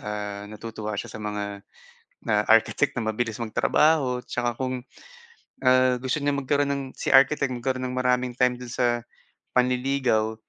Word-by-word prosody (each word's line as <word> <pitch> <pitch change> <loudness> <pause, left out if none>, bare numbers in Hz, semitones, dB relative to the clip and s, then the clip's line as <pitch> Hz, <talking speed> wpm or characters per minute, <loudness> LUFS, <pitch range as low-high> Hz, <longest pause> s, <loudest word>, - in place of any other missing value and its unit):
ah, 105 -1 -5
natutuwa 105 -1 -6
siya 120 - -6
sa 110 - -8
mga 105 -1 -4 0.7
na, 105 0 +3
architect 115 +5 +4
na 115 - -3
mabilis 115 0 -3
magtrabaho 125 +3 +2
'tsaka 120 -1 -2
kung, 130 -1 -3 0.8
ah, 130 0 +4
gusto 130 +3 -1
niyang 140 -1 -1
magkaroon 140 +1 +1
ng 140 -1 -3 0.2
si - - -5
architect 140 0 +5
magkaroon 130 +1 -2
ng 125 - -5
maraming 125 -1 +1
time 125 -1 +2
do'n 125 -2 -8
sa 125 -1 +2 0.7
panliligaw, 125 -3 +1
125 Hz, 150 wpm, -25 LUFS, 110-130 Hz, 0.8 s, architect